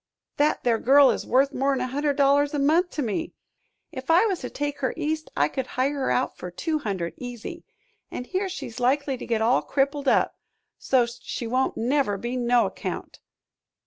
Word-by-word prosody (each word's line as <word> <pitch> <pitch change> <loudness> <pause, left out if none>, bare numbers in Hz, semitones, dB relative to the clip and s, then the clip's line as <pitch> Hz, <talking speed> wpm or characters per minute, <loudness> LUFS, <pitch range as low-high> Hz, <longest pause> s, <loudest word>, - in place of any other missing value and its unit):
"That 295 +1 +2
there 230 -2 +2
girl 275 +1 +6
is - - -4
worth 270 +3 +3
more'n 270 0 +1
a 255 - -1
hundred 285 +3 -1
dollars 285 +1 +3
a - - 0
month 320 +6 +3
to 295 - -1
me. 245 +8 -3 0.6
If 260 +1 -8
I 345 +6 +6
was 385 -6 0
to 250 - -5
take 290 0 -3
her 260 - -1
East 310 0 -2
I 145 - +4
could 260 - -4
hire 265 +3 +2
her 275 -2 -1
out 255 - 0
for 180 - -7
two 310 - -2
hundred, 190 - -3
easy, 245 +7 -7 0.4
an' - - -5
here 375 +8 -2
she's 250 -10 -7
likely 270 +2 +1
to - - -8
get 225 -2 +1
all 240 +3 +3
crippled 280 0 -1
up, - - +2 0.4
so's't 245 -2 +1
she 235 - -5
won't 255 +3 0
never 245 -3 +1
be 240 +5 -4
no 245 -1 +3
account." - - -6
270 Hz, 195 wpm, -25 LUFS, 245-290 Hz, 0.6 s, girl